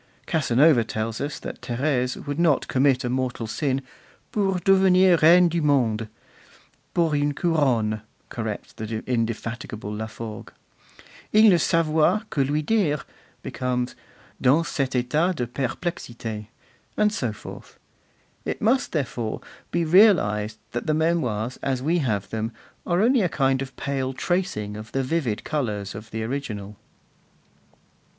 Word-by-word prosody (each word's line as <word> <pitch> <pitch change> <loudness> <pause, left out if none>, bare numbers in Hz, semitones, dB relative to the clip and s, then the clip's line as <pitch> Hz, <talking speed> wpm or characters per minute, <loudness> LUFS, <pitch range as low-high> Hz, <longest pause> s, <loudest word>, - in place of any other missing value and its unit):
Casanova 145 -4 +4
tells 110 0 -3
us 145 +1 -3
that - - -7
Thérèse 125 0 -1
would 145 +2 -3
not 165 -5 +3
commit 130 -1 +2
a - - -1
mortal 130 -2 -2
sin 135 +4 -1 0.5
'pour 195 -3 +1
devenir 185 -1 +5
reine 175 +3 +7
du 170 0 -1
monde;' 120 -7 +2 0.9
pour 165 -3 +2
une 145 0 +1
couronne,' 125 - +1 0.3
corrects - - -5
the 110 0 -5
indefatigable 115 -2 -3
Laforgue. 110 +1 -6 0.8
'Il 215 0 +7
ne 175 - +5
savoit 165 +6 +2
que 140 - +2
lui 150 +3 0
dire' 160 -7 +1 0.4
becomes 125 -1 -2 0.5
'Dans 145 +6 +4
cet 135 -2 -1
etat 155 +9 +1
de 125 - -1
perplexite;' 120 -4 -4 0.5
and 210 0 +3
so 125 - -1
forth. 105 - -11 0.7
It - - -3
must, 245 +5 +1
therefore, 120 -7 -2 0.3
be 170 -1 0
realized 110 - +4
that 120 - -4
the 155 - +2
Memoirs, 130 -9 0
as 130 -2 -1
we 170 +4 +2
have 105 - -1
them, 110 +1 -2 0.4
are 175 +1 +2
only 250 +1 +4
a 180 - +1
kind 135 -3 +1
of 135 0 -6
pale 135 -2 -2
tracing 130 - -2
of 110 0 -9
the 135 - 0
vivid 130 -6 -1
colours 105 -10 -2
of 110 +2 -9
the 110 0 -4
original. 110 -5 -4
135 Hz, 135 wpm, -24 LUFS, 115-165 Hz, 0.9 s, reine